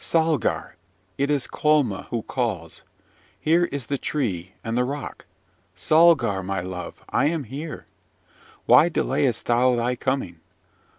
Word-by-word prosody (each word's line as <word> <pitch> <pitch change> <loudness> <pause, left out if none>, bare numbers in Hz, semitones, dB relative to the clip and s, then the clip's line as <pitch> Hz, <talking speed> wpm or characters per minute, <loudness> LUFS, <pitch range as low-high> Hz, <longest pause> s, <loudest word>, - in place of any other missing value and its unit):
Salgar! 160 - 0 0.4
it 140 +1 +1
is 145 -3 +1
Colma 150 -10 +1
who 115 -2 -3
calls. 100 -11 -3 0.6
Here 170 +3 +3
is 140 -6 -5
the 140 +2 -2
tree 95 - -3
and 115 +1 -3
the 125 - +2
rock. 140 +2 -6 0.5
Salgar, 155 - +4
my 95 0 -3
love, 90 0 -7
I 140 - +2
am 160 -1 -1
here! 145 +6 -7 0.8
Why 165 - +6
delayest 135 -6 0
thou 125 +1 +3
thy 120 +1 0
coming? 125 -10 -2
130 Hz, 130 wpm, -24 LUFS, 110-150 Hz, 0.8 s, Why